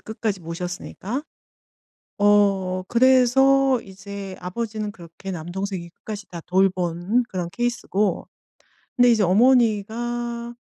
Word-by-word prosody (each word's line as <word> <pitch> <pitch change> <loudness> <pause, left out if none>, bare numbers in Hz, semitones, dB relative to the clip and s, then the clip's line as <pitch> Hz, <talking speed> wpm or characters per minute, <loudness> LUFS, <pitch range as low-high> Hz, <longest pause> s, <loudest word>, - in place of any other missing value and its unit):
끝까지 215 -3 -3
모셨으니까. 180 - -5 1.0
어 200 -3 +3
그래서 260 +2 +4
이제 195 -1 -9
아버지는 210 +3 -4
그렇게 170 +2 -10
남동생이 175 +1 -5
끝까지 210 +2 -8
다 170 -1 -7
돌본 185 +4 +1
그런 180 -2 -3
케이스고 210 -4 -1 0.7
근데 245 0 +5
이제 220 -3 +4
어머니가 235 +2 +1
205 Hz, 255 characters per minute, -23 LUFS, 185-235 Hz, 1.0 s, 근데